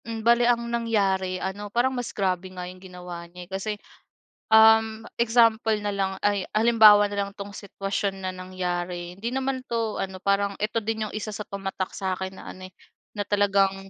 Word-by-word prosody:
Hmm, 225 Hz, -1 st, -5 dB
bale 235 Hz, +1 st, +5 dB
ang 235 Hz, -1 st, +2 dB
nangyari 195 Hz, -5 st, 0 dB
ano, 195 Hz, +3 st, -5 dB
parang 240 Hz, +5 st, +1 dB
mas 245 Hz, -3 st, -3 dB
grabe 185 Hz, -2 st, -1 dB
nga 180 Hz, -1 st, -7 dB
yung 180 Hz, 0 st, -10 dB
ginawa 180 Hz, -2 st, -9 dB
niya, 180 Hz, +1 st, -10 dB
eh. -, -, -29 dB
Kasi, 195 Hz, +3 st, -2 dB, 0.8 s
um, 220 Hz, 0 st, +5 dB
example 230 Hz, -2 st, +3 dB
nalang 200 Hz, -2 st, -2 dB
ay 205 Hz, -2 st, +1 dB
halimbawa 215 Hz, -2 st, +7 dB
na 200 Hz, 0 st, -1 dB
lang -, -, -10 dB
'tong 200 Hz, 0 st, -7 dB
sitwasyon 195 Hz, -1 st, -3 dB
na 185 Hz, -, -1 dB
nangyari, 180 Hz, -1 st, -4 dB
hindi 225 Hz, +4 st, -3 dB
naman 265 Hz, 0 st, -1 dB
'to 230 Hz, -2 st, -1 dB
ano, 190 Hz, -1 st, -4 dB
parang 200 Hz, 0 st, +1 dB
'eto 215 Hz, +2 st, 0 dB
din 220 Hz, 0 st, -2 dB
yung -, -, -13 dB
isa 215 Hz, 0 st, -4 dB
sa 210 Hz, -, -5 dB
tumatak 195 Hz, -1 st, -4 dB
sa'kin 190 Hz, -1 st, -3 dB
na -, -, -9 dB
ano, 185 Hz, -, -10 dB
eh, -, -, -37 dB, 0.4 s
na -, -, 0 dB
talagang 195 Hz, -1 st, +2 dB
200 Hz, 180 wpm, -25 LUFS, 190-220 Hz, 0.8 s, halimbawa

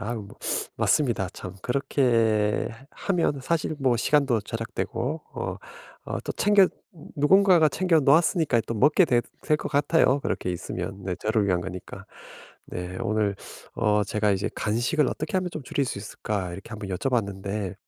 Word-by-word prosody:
아우 110 Hz, +1 st, -3 dB
뭐 100 Hz, -, -14 dB, 0.4 s
맞습니다 120 Hz, -, +1 dB
참. 95 Hz, -2 st, -8 dB
그렇게 115 Hz, -5 st, +1 dB
해 115 Hz, +4 st, -14 dB
하면 170 Hz, -7 st, 0 dB
사실 155 Hz, +2 st, -1 dB
뭐 130 Hz, -3 st, +2 dB
시간도 135 Hz, -1 st, +2 dB
절약되고 115 Hz, +6 st, -4 dB
어 -, -, -4 dB, 0.5 s
어 -, -, -2 dB
또 -, -, -4 dB
챙겨 200 Hz, -2 st, +4 dB, 0.5 s
누군가가 175 Hz, +2 st, +5 dB
챙겨 170 Hz, +2 st, +2 dB
놓았으니까 150 Hz, -, +3 dB
또 115 Hz, -, -3 dB
먹게 150 Hz, -, +5 dB
되 120 Hz, -6 st, +3 dB, 0.2 s
될 155 Hz, -1 st, +2 dB
것 -, -, -5 dB
같아요 145 Hz, -1 st, +3 dB
그렇게 95 Hz, -, -2 dB
있으면 90 Hz, +2 st, -5 dB
네 95 Hz, -1 st, -2 dB
저를 110 Hz, -1 st, 0 dB
위한 90 Hz, -2 st, +1 dB
거니까. 90 Hz, 0 st, -8 dB, 0.6 s
네. 90 Hz, +1 st, -5 dB
오늘 105 Hz, -1 st, 0 dB, 0.4 s
어 105 Hz, -2 st, +2 dB
제가 105 Hz, -1 st, +1 dB
이제 95 Hz, +1 st, -1 dB
"간식을 120 Hz, +7 st, +1 dB
어떻게 155 Hz, +4 st, -3 dB
하면 185 Hz, -1 st, -1 dB
좀 155 Hz, -, -5 dB
줄일 140 Hz, +1 st, -1 dB
수 125 Hz, -, -4 dB
있을까?" 100 Hz, -2 st, -4 dB
이렇게 95 Hz, +5 st, -9 dB
한번 105 Hz, -3 st, -6 dB
여쭤봤는데 100 Hz, -2 st, -2 dB
115 Hz, 320 characters per minute, -26 LUFS, 100-150 Hz, 0.6 s, 누군가가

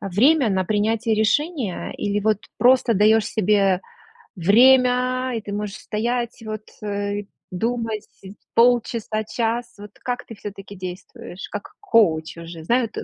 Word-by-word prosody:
время 235 Hz, -, +3 dB
на 190 Hz, -1 st, +1 dB
принятие 220 Hz, +3 st, +1 dB
решения 225 Hz, -, 0 dB
или 205 Hz, 0 st, -1 dB
вот 215 Hz, 0 st, +2 dB, 0.2 s
просто 250 Hz, -2 st, +4 dB
даёшь 215 Hz, +2 st, +4 dB
себе 200 Hz, -3 st, +2 dB, 0.6 s
время, 250 Hz, +5 st, +4 dB
и -, -, -4 dB
ты 205 Hz, -1 st, -7 dB
можешь 205 Hz, -1 st, -4 dB
стоять 235 Hz, +2 st, -3 dB
вот, 215 Hz, 0 st, -5 dB, 0.2 s
э, 205 Hz, 0 st, -3 dB, 0.3 s
думать 225 Hz, +2 st, -2 dB, 0.2 s
сь 195 Hz, +1 st, -11 dB, 0.2 s
полчаса-час? 230 Hz, 0 st, +1 dB
Вот 205 Hz, 0 st, -10 dB
как 250 Hz, 0 st, -3 dB
ты 225 Hz, -, -10 dB
всё-таки 200 Hz, -1 st, -9 dB
действуешь, 185 Hz, +2 st, -8 dB
как 205 Hz, -1 st, -7 dB
коуч 165 Hz, -9 st, +2 dB
уже, 165 Hz, -1 st, -9 dB
знаю 235 Hz, +6 st, +2 dB
ты -, -, -6 dB
215 Hz, 135 wpm, -22 LUFS, 200-240 Hz, 0.6 s, просто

